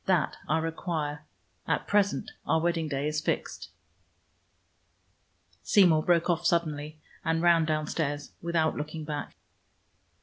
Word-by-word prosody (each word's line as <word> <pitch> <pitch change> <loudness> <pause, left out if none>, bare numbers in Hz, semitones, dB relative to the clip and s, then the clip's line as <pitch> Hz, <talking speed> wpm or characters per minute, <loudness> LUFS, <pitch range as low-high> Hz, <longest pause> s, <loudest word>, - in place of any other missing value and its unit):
That 185 -5 +2
I 155 - +2
require. 160 -2 -3 0.4
At - - 0
present 200 -1 +1 0.2
our 160 - +3
wedding 165 -1 0
day 140 0 -1
is 150 0 -1
fixed." - - -3 1.9
Seymour 175 -7 +5
broke 170 0 +2
off 175 -1 +1
suddenly 155 -3 0 0.3
and 165 0 0
ran 170 -2 +5
downstairs 155 -1 -2
without 165 -2 +1
looking 155 +1 -5
back. 150 -1 -5
160 Hz, 115 wpm, -28 LUFS, 150-170 Hz, 1.9 s, Seymour